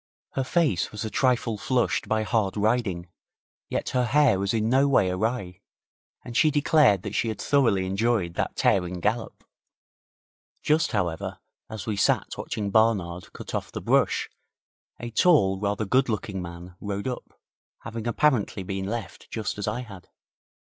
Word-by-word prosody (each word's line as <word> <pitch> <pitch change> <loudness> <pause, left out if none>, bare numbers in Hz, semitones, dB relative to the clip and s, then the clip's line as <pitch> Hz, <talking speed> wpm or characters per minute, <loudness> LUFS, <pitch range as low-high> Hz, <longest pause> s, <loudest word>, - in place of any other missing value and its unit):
Her 135 - -1
face 150 - +1
was 105 +1 -5
a 110 - -4
trifle 120 -4 +1
flushed 125 +2 0
by 110 0 +1
hard 110 -3 0
riding, 105 -5 0 0.6
yet - - -2
her 125 -1 +1
hair 135 -5 +4
was 100 0 0
in 110 -1 0
no 135 +4 +4
way 100 -9 +3
awry, 90 -2 -2 0.6
and 120 - -8
she 155 +3 +5
declared 145 - +4
that 105 - -5
she 115 - 0
had 110 -2 -3
thoroughly 115 -10 +2
enjoyed 100 -2 0
that - - -2
tearing 90 -1 +1
gallop. 110 +6 -2 1.2
Just, 155 +1 +2
however, 85 -6 -2 0.3
as 110 -3 -6
we 105 -2 -2
sat 100 - +1
watching 100 -2 -4
Barnard 95 -6 +1
cut - - -9
off - - -3
the - - -5
brush, - - +2 0.7
a 120 0 -6
tall, 110 - +4
rather 105 +1 -1
good 130 +6 +2
looking 105 -3 -3
man 85 +1 -9
rode 100 +2 -3
up, 125 - -6 0.4
having 115 0 -6
apparently 120 -6 +1
been 95 0 -4
left 105 -4 -6
just 110 -2 -4
as 105 - -3
I 110 +4 -1
had. 100 -7 -11
110 Hz, 160 wpm, -26 LUFS, 95-120 Hz, 1.2 s, she